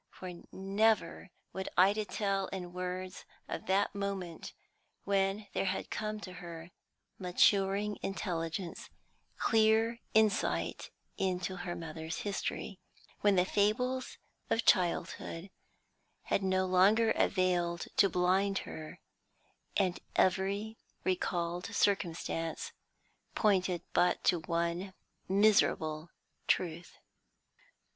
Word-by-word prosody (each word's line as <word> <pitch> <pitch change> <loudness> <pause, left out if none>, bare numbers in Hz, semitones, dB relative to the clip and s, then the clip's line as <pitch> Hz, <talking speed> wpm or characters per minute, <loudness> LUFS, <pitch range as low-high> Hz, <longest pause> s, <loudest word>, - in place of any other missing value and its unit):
For 185 -1 -8 0.2
never 195 -1 +1 0.2
would 190 0 -4
Ida 200 +4 +4
tell 195 -2 -1
in 180 -2 -6
words 185 0 -5 0.2
of - - -5
that 195 +2 +2
moment 195 -4 -4 0.5
when 195 +1 +1
there - - 0
had 190 0 -2
come 215 0 -3
to 185 -2 -8
her 170 0 -9 0.5
maturing 195 +2 +2
intelligence 175 -2 -3 0.5
clear 225 +1 +3 0.2
insight 220 -2 +2 0.3
into 185 0 -1
her 175 0 -4
mother's 160 0 -5
history, 200 -1 -3 0.4
when 205 -1 +4
the 180 -1 +4
fables 250 +7 0 0.3
of 230 - +1
childhood 175 0 +1 0.7
had - - 0
no 190 0 +1
longer 200 +5 +4
availed 175 -2 +1
to 195 - +6
blind 190 +3 +2
her, 155 -1 -8 0.8
and 185 -3 +1 0.2
every 200 +4 +1 0.2
recalled 175 -1 -1
circumstance 195 - -1 0.6
pointed 185 -4 +2
but 175 0 +3
to 175 - +3
one 170 +3 -2 0.3
miserable 175 -6 +3 0.4
truth. 170 -1 -1
190 Hz, 100 wpm, -32 LUFS, 175-200 Hz, 0.8 s, to